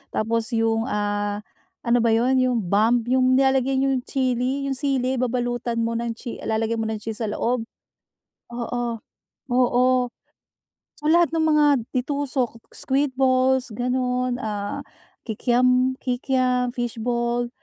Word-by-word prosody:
tapos 225 +1 0
yung, 225 +1 +1
ah, 205 -2 -2 0.4
ano 240 0 +3
ba 230 - +2
yun, 255 +3 +2
yung 255 -1 +2
bomb, 220 +6 +2
yung 255 0 +4
nilalagay 265 0 +2
yung 270 -1 +1
chili, 260 0 0
yung 275 -1 -1
sili, 265 -2 0
babalutan 245 -1 -1
mo 230 - -1
ng 230 0 -2
chi 235 0 -7
lalagyan 225 +1 -1
mo 220 - -1
ng 220 0 -2
cheese 225 0 -5
sa 225 - -1
loob. 230 +2 -1 0.9
Oo, 240 0 -2 0.6
oo. 250 0 +3 1.2
So, - - -23
lahat 335 -1 +4
ng 325 - +1
mga 300 -1 +4 0.3
de-tusok, 260 -3 -2
squid 270 -1 -1
balls, 260 -1 +2
gano'n, 250 +1 -1
ah, 205 -4 -4 0.4
kikiam 250 +3 +2
kikiam, 250 -1 0
fishball, 240 0 -2
245 Hz, 130 wpm, -23 LUFS, 230-260 Hz, 1.2 s, yung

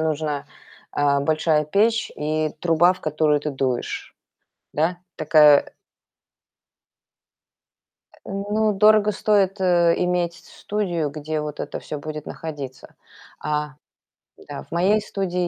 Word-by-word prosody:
нужно, 150 -2 -2 0.5
э, 140 -1 +2
большая 155 +1 +1
печь 220 +8 +1
и 155 +1 -1
труба, 175 +1 +4
в 185 - -13
которую 150 -1 +1
ты 150 - -3
дуешь, 130 -3 -3 0.6
да, 165 +4 0 0.2
такая 150 -2 +5 2.4
Э, - - -21
ну, 205 +2 0
дорого 210 +1 +4
стоит, 200 -1 +1
э, 175 -2 +4
иметь 180 -1 0
с - - -17
студию, 175 -8 -2
где 155 +1 -4
вот 150 -1 -5
это - - -5
всё 150 - -6
будет 150 +1 -7
находиться. 140 -5 -8 0.5
А 150 0 -2 0.8
Да, 70 - -6
в - - -25
моей 190 +5 +3
студии 180 -4 -2
160 Hz, 120 wpm, -23 LUFS, 150-190 Hz, 2.4 s, такая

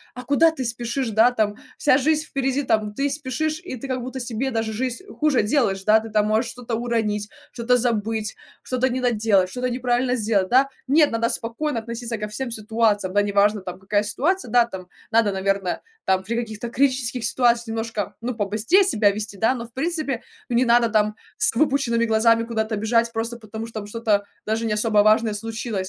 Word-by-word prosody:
а 250 - -7
куда 285 +5 +4
ты 315 -5 -4
спешишь, 240 +2 -2
да, 220 +3 +5
там 215 -4 0 0.2
вся 260 - +4
жизнь 310 +3 +1
впереди. 270 +1 -1
Там 215 -4 +1
ты 275 - +1
спешишь, 290 +3 -2
и 310 - -5
ты 270 - -7
как 255 -1 -2
будто 255 +2 -6
себе 245 +2 -2
даже 225 -2 -2
жизнь 255 - -3 0.2
хуже 300 -7 +3
делаешь, 210 -5 +1
да, 215 +1 +6
ты 225 +1 -8
там 210 -1 +2
можешь 220 +3 +1
что-то 245 -2 -5
уронить, 220 -3 -1 0.2
что-то 240 +1 +1
забыть, 225 -2 -1 0.3
что-то 255 0 0
не 260 0 -2
доделать, 215 -6 +2
что-то 250 0 -2
неправильно 250 0 0
сделать, 210 -4 +1
да? 265 +2 +5 0.2
Нет, 295 +1 +4
надо 230 +1 0
спокойно 235 +3 -2
относиться 235 +1 -5
ко 210 - -3
всем 240 +5 -5
ситуациям, 215 -3 0
да, 205 - +4
неважно, 205 0 +2
там 180 0 -7
какая 205 +2 0
ситуация, 275 - -1
да. 240 -1 +5
Там 190 -5 -9 0.2
надо, 225 -2 +3
наверно, 195 -1 -1 0.3
там 190 0 +2
при 225 +5 -3
каких-то 230 -1 -4
критических 255 -2 0
ситуациях 235 -2 +2
немножко, 225 -3 -3
ну, 245 +2 -2
побыстрее 220 - +2
себя 220 - +3
вести, 205 0 -5
да, 225 +6 +2
но 235 -2 -6
в - - -24
принципе, 295 -3 -2 0.3
ну, 240 - +1
не 255 - +3
надо 235 0 +4
там 215 -1 +1 0.2
с - - +2
выпученными 250 -4 +2
глазами 230 +1 +3
куда-то 220 -1 -2
бежать, 230 +2 +1
просто 230 +1 -3
потому 220 0 -7
что 225 -1 -6
там 205 - -8
что-то 210 -2 0 0.2
даже 220 +1 -1
не 220 - 0
особо 210 -1 +3
важное 215 +1 +3
случилось. 225 +1 -4
230 Hz, 195 wpm, -23 LUFS, 215-250 Hz, 0.3 s, да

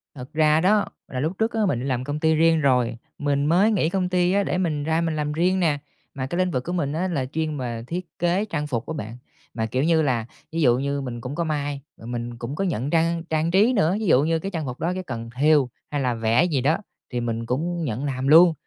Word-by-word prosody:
Thật 130 +2 -9
ra 155 0 +4
đó, 205 +3 +3 0.2
là 130 - -4
lúc 160 +7 -2
trước 225 +1 0
á, 220 -2 +1
mình 125 -11 0
đi 130 - -4
làm 130 -2 -1
công 145 +2 -3
ty 160 0 +3
riêng 165 0 +4
rồi, 125 -4 +2 0.2
mình 145 -1 0
mới 185 +8 +4
nghỉ 170 -6 +2
công 185 -1 -1
ty 180 0 +2
á, 200 +1 +2
để - - -1
mình 155 -6 -1
ra 160 +2 +1
mình 165 -2 -1
làm 150 -1 -1
riêng 180 +4 +2
nè, 155 -5 +2 0.4
mà 130 -1 -3
cái 175 - -3
lĩnh 185 -1 +1
vực 125 -3 -1
của 175 - -4
mình 150 -5 -1
á, 180 +4 0
là 140 -7 -1
chuyên 155 +2 -3
về 120 -3 -4
thiết 180 +2 -4
kế 175 +4 +1
trang 150 -7 -3
phục 120 -6 -2
á 160 - -3
bạn. 115 -4 -6 0.4
Mà, 110 -1 -1
kiểu 130 +4 -1
như 160 0 +3
là, 125 -7 0 0.3
ví 165 +1 -1
dụ 125 -3 +4
như 140 +1 -1
mình 120 -3 -5
cũng 130 +4 -5
có 170 - 0
may, 145 -3 -2 0.2
ờ, 115 - -12
mình 120 0 -5
cũng 120 +5 -5
có 195 - -1
nhận 145 - -1
trang 165 0 +1
trang 160 +1 +1
trí 210 +7 +4
nữa, 185 -4 +2
ví 220 - -2
dụ 140 -5 +5
như 165 +1 +1
cái 195 +4 -5
trang 165 -5 -3
phục 125 -1 -6
đó, 175 +2 0
cái 185 - -4
cần 115 -7 -6
thêu 145 -1 +4 0.2
hay 145 - -1
là 125 -2 +1
vẽ 115 +5 +2
gì 155 -7 +1
đó, 150 +6 +2 0.4
thì 120 - 0
mình 115 -1 -2
cũng 165 +8 -2
nhận 130 0 -2
làm 135 -1 -2
luôn. 165 +3 +8
150 Hz, 270 wpm, -24 LUFS, 130-170 Hz, 0.4 s, luôn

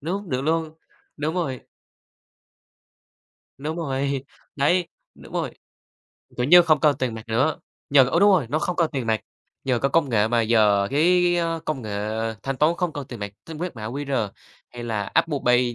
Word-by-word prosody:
Đúng, 185 +5 -4
được 130 0 0
luôn, 160 +1 -1 0.4
đúng 155 +3 -2
rồi. 135 -8 -2 2.0
Đúng 155 +4 -4
rồi, 140 -3 -2 0.3
đấy, 170 +5 +2 0.3
đúng - - -15
rồi. - - -2 0.9
Kiểu 125 +1 0
như, 175 +3 +8
không 155 -4 +3
cần 150 -2 +4
tiền 125 -3 -1
mặt 110 - -7
nữa, 130 +7 +1 0.3
nhờ 140 -2 +7
ô, 170 - +1
đúng 205 0 +6
rồi, 170 -11 +3
nó 150 - 0
không 175 +3 -2
cần 165 -2 +2
tiền 130 -4 -3
mặt, 110 -2 +1 0.4
nhờ 125 -3 +1
có 140 - +1
công 160 0 +2
nghệ 110 -1 +2
mà 120 0 +2
giờ 105 -3 +3
cái 145 +3 +2 0.2
cái 175 0 +3
cái 165 -1 -1
công 155 -6 -3
nghệ 105 - -6 0.5
thanh 135 -1 -3
toán 155 +4 +3
không 175 -4 -1
cần 145 -2 -5
tiền 120 -4 -8
mặt. 100 0 -5
Tính 160 -2 -8
quét 175 -6 -4
mã 110 - -6
QR 135 -4 -2 0.4
hay 120 -1 -8
là 110 -3 -2
Apple 160 +5 +1
Pay, 125 -1 +3
140 Hz, 195 wpm, -23 LUFS, 120-165 Hz, 2.0 s, như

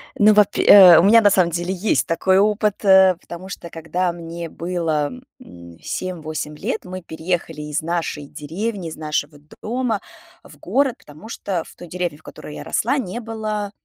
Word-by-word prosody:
Ну, 210 +1 +5
вапь 205 -1 +3
и, - - +3
э, 185 -4 +9
у - - +3
меня 225 +4 +6
на 205 - +5
самом 180 -3 +3
деле 175 +3 -2
есть 180 - 0
такой 185 +3 +2
опыт, 210 0 +1
э, 190 -1 +6
потому 175 +2 -10
что, 170 -3 -8
когда 165 +3 -2
мне 170 0 -7
было, 165 -4 -2 0.3
м, 85 - -14
7-8 155 -4 -5
лет, 220 - -4
мы 185 0 -7
переехали 165 -1 -4
из 150 +1 -3
нашей 165 -3 -3
деревни, 180 +6 -5
из 155 - -8
нашего 150 -1 -3 0.2
дома 235 -2 -2 0.4
в - - -16
город, 270 -3 0
потому 155 +9 -14
что 185 -7 -3
в - - -16
той 175 - -11
деревне, 175 -3 -4
в 155 - -25
которой 150 - -10
я - - -7
росла, 250 +6 0
не 235 -3 -4
было 215 -3 -4
180 Hz, 180 wpm, -20 LUFS, 160-205 Hz, 0.4 s, э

